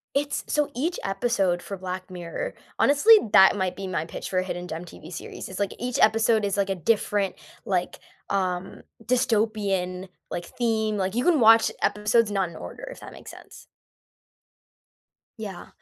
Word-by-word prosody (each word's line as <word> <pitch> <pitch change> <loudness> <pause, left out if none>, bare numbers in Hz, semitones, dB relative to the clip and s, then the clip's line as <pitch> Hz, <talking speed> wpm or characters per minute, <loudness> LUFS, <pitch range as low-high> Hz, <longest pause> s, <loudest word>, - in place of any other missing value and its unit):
It's 285 0 -1
so, 295 -1 +1
each 330 +8 -1
episode 195 -3 0
for 195 - -7
Black 185 0 -6
Mirror 180 - -5 0.3
honestly, 290 +11 +7 0.2
that 190 0 +8
might 190 -2 -1
be 195 -1 -6
my 170 -3 -2
pitch - - -7
for 185 - +1
a - - 0
hidden 180 -1 -5
gem 165 +1 -5
TV 165 -1 -12
series, 165 - -7
it's 190 +1 -7
like 200 - -1
each 245 0 -2
episode 220 0 +4
is 200 0 -1
like 200 -1 +1
a 195 - 0
different, 200 +2 0 0.3
like, 180 -2 -1 0.3
um, 185 -1 -2 0.2
dystopian, 205 -6 0 0.2
like, 175 0 -4
theme, 220 -2 -1
like, 190 -1 -1
you 245 - +1
can 345 -4 +4
watch 225 -1 +6
episodes 210 +1 +2
not 195 -3 0
in 170 - -13
order, - - -9
if - - -11
that - - -10
makes - - -11
sense. - - -14 1.7
Yeah, 200 -5 -8
200 Hz, 170 wpm, -25 LUFS, 185-225 Hz, 1.7 s, that